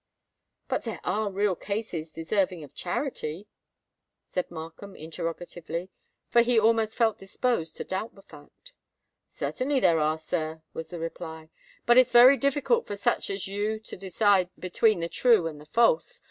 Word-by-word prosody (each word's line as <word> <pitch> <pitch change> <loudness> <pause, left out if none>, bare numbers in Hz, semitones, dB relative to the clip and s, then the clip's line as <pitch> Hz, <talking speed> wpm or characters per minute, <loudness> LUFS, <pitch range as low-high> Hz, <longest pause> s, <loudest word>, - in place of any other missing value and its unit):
"But - - -1
there 225 -3 -5
are 205 +3 0
real 200 -1 +1
cases 190 -6 -4
deserving 180 +1 -1
of 145 - -13
charity?" 180 - -4 0.8
said 180 - -3
Markham, 170 +4 -9
interrogatively,—for 170 +6 -3
he 240 -1 +3
almost 220 0 +2
felt 225 -2 +2
disposed 195 -3 -2
to - - -3
doubt 190 +4 -4
the 195 - -16
fact. 195 - -16 0.5
"Certainly 270 +1 -1
there 165 -1 +4
are, 155 +1 +1
sir," 160 0 -4
was 160 0 -6
the 175 - -6
reply; 160 -1 -7 0.3
"but 240 +1 +7
it's 255 -1 +4
very 245 +3 +9
difficult 285 - +1
for 205 - -4
such 200 - 0
as 195 -1 -3
you 205 +2 -2
to - - -9
decide 190 0 +2
between 185 +1 +2
the 170 - -1
true 225 -1 +3
and 155 -2 -5
the 150 - -15
false. 475 - +2
195 Hz, 155 wpm, -27 LUFS, 165-225 Hz, 0.8 s, very